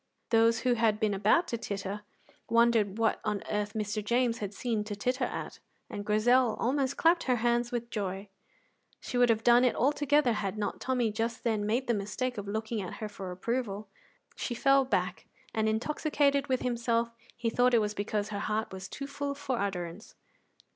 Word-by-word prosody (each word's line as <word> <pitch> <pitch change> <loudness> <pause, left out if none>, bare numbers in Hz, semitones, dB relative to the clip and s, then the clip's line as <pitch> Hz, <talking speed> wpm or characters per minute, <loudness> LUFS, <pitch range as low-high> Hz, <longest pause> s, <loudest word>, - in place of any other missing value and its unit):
Those 230 0 +4
who 250 -1 +3
had 220 -2 +2
been 215 -2 +1
about 210 - +3
to 235 - -2
titter 200 -1 -4 0.5
wondered 230 -3 +3
what 225 -1 +1
on 205 -1 -2
earth 210 0 -1
Mr. 210 -1 -2
James 235 +2 +1
had 205 -2 -4
seen 220 0 -2
to 210 -1 -4
titter 250 +5 0
at, - - -6 0.3
and 205 - -4
Grizel 225 +3 +3
almost 270 +2 0
clapped 335 +1 +3
her 255 - +3
hands 240 +1 +1
with 240 0 -3
joy; 195 -1 -3 0.7
she - - -7
would 245 -1 +5
have 225 -1 +2
done 240 +1 +6
it 250 - +3
altogether 290 -1 +3
had 205 -1 -3
not 210 - -3
Tommy 250 -4 +1
just 225 +2 -3
then 215 -4 0
made 240 +5 +1
the 240 - +1
mistake 210 +4 -2
of 200 - -7
looking 220 +1 -2
at 185 - -6
her 215 - -5
for 195 -3 -7
approval. 210 +1 -3 0.5
She 240 - -3
fell 275 +1 +4
back, 260 - -1 0.3
and, 220 0 +1
intoxicated 280 +4 +1
with 260 -2 0
himself, 235 -1 0 0.3
he 235 -1 -1
thought 245 +1 +3
it - - +6
was 210 -1 -1
because 205 0 -2
her 205 -1 -3
heart 215 0 -2
was 190 0 -6
too 275 - -6
full 280 0 -4
for 265 -3 -2
utterance. 185 0 -4
230 Hz, 190 wpm, -30 LUFS, 210-250 Hz, 0.7 s, done